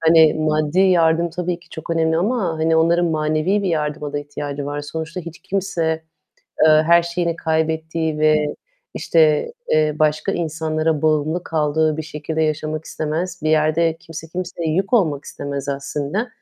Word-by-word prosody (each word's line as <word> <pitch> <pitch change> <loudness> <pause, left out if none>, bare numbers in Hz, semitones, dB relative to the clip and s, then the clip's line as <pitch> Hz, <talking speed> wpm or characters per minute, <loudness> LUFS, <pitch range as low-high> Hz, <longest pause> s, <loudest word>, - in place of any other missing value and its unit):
Hani 160 -1 +6
maddi 155 +2 +1
yardım 170 -2 +3
tabii 180 0 -3
ki 175 - -22
çok 160 +1 -8
önemli 160 -1 +2
ama, 205 +2 0
hani, 160 0 +2
onların 170 +2 +3
manevi 155 +5 0
bir 190 - 0
yardıma 150 -2 -2
da 145 - -1
ihtiyacı 145 -1 -5
var. 145 0 -3
Sonuçta 160 +4 -5
hiç 170 -1 -9
kimse, 170 -5 -1 0.6
eee, - - +6 0.2
her 170 0 +6
şeyini 170 -1 -2
kaybettiği 160 0 -1
ve 155 -1 +3 0.4
işte, 155 - +2 0.2
eee, 155 -1 +3
başka 155 +5 +1
insanlara 160 -2 -1
bağımlı 155 +2 +1
kaldığı 155 0 +1
bir 160 - -3
şekilde 155 +1 -3
yaşamak 155 0 -2
istemez. 165 +4 -3
Bir 155 - +1
yerde 155 +1 +2
kimse 165 -1 -9
kimseye 175 -1 -4
yük 195 +4 -1
olmak 160 - +2
istemez 140 0 -5
aslında. 140 - -2
160 Hz, 155 wpm, -20 LUFS, 155-170 Hz, 0.6 s, Hani